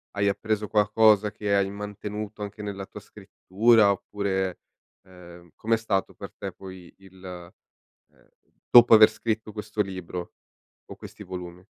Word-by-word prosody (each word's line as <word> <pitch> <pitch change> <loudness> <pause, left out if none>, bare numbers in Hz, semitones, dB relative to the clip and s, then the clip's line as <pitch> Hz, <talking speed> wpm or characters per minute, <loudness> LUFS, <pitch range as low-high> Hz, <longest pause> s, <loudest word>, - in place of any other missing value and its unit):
hai 100 0 +1
appreso 105 +1 -2
qualcosa 105 0 +3
che 105 0 -3
hai 100 -1 +1
mantenuto 105 +1 -7
anche 105 +1 -7
nella 100 -1 -6
tua - - -11
scrittura, 110 +2 +2
oppure 95 -2 -3 0.4
ehm, 85 -2 -15
come 115 +1 0
è - - -2
stato 105 -4 -2
per - - -10
te, - - -6
poi 95 -2 -12
il 95 -1 -18
ehm, 90 -1 -12 0.9
dopo 120 -1 +8
aver 110 0 +9
scritto 110 0 -4
questo 105 0 -4
libro, 90 -3 -6 0.5
o - - -11
questi - - -12
volumi? 90 0 -9
100 Hz, 140 wpm, -25 LUFS, 95-105 Hz, 0.9 s, aver